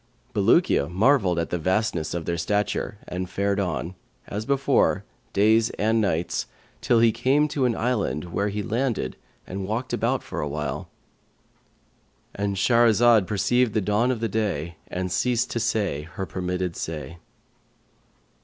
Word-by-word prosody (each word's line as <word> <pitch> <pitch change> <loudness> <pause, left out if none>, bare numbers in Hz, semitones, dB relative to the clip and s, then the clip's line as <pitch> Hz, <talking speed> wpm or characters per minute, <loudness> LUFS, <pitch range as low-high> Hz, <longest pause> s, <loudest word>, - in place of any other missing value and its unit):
Bulukiya 105 - +3
marvelled 95 -1 +3
at 85 - -2
the 90 - -1
vastness 90 -2 0
of 85 -2 -3
their 85 - -1
stature 105 +4 -1
and 90 0 -4
fared 100 +1 0
on, 90 -1 -2 0.3
as 105 +3 -5
before, 140 0 +2 0.3
days 110 +3 +4
and 110 +2 +2
nights, 85 -4 -1 0.3
till 115 -1 +3
he 115 -1 +5
came 140 +7 +2
to 135 -3 0
an 120 -2 +1
island 95 - -1
where 100 +3 0
he 105 +1 -3
landed 115 - -1 0.3
and 95 +1 -5
walked 115 +5 -3
about - - 0
for - - -5
a 75 - -2
while,"—And 75 +6 -8
Shahrazad 115 -1 +4
perceived 110 +4 +1
the - - +4
dawn 105 +5 +1
of 125 -3 -1
day 85 -7 -2
and 90 0 -3
ceased 120 +5 +1
to 120 - -1
say 105 -9 0
her 95 - -3
permitted 90 -1 -3
say. 80 +1 -6
100 Hz, 145 wpm, -25 LUFS, 90-115 Hz, 0.3 s, he